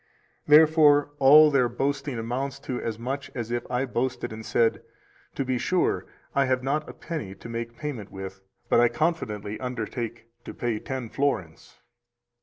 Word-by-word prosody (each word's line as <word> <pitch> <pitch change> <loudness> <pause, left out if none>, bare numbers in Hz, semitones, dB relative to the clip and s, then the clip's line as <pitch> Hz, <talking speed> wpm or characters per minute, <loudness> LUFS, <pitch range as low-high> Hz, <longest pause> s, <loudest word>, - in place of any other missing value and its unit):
Therefore 150 -1 +6
all 150 +3 +8
their 130 -4 +3
boasting 135 +2 -2
amounts 125 +4 -3
to 125 - -4
as 110 -2 -3
much 130 +4 -4
as 120 -2 -4
if 120 0 -3
I 125 +1 0
boasted 120 -2 -2
and 110 0 -8
said: 115 0 +1 0.5
To 135 - -1
be 130 -1 0
sure, 185 +4 0 0.3
I 140 -1 +3
have 130 -1 0
not 150 +3 -1
a - - -8
penny 150 - -6
to 100 - -11
make 115 0 -5
payment 135 -9 -5
with, 95 0 -8 0.3
but - - +4
I 120 - +6
confidently 110 -10 -2
undertake 115 -2 -4 0.2
to - - -8
pay 115 -3 -2
ten 130 -2 -5
florins. 95 - -2
125 Hz, 165 wpm, -26 LUFS, 115-140 Hz, 0.5 s, all